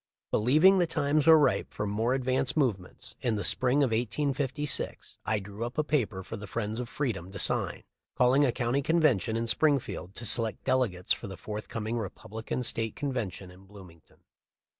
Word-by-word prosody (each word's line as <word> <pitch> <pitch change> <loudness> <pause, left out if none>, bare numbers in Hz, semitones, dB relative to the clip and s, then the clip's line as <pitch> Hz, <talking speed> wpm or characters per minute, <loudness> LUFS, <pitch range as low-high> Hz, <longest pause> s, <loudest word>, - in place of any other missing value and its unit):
Believing 155 - +5
the 175 - +2
times 150 0 +1
were 160 -1 +9
ripe 150 - +1
for 105 - -3
more 110 +5 0
advanced 130 +2 0
movements, 105 -11 -1
in 120 -3 0
the 105 - -2
spring 130 +3 +3
of 130 - +1
1856 135 +4 -1
I 110 - +2
drew 100 +2 -6
up 120 +2 -5
a 155 - +2
paper 115 -11 -1
for 110 - -7
the 105 0 -8
friends 110 +2 -3
of 125 -1 -5
freedom 100 - -3
to 100 - -7
sign, - - 0 0.3
calling 125 +3 +4
a 135 - +3
county 120 +3 0
convention 145 - +2
in 115 - -1
Springfield 125 - 0
to 120 - -5
select 115 -1 +1
delegates 125 -9 +1
for - - -7
the 95 -2 -8
forthcoming 110 +4 -4
Republican 110 +4 -5
State 115 -1 -2
convention 115 - -4
in 95 +2 -17
Bloomington. 95 -5 -16
120 Hz, 175 wpm, -29 LUFS, 105-140 Hz, 0.3 s, were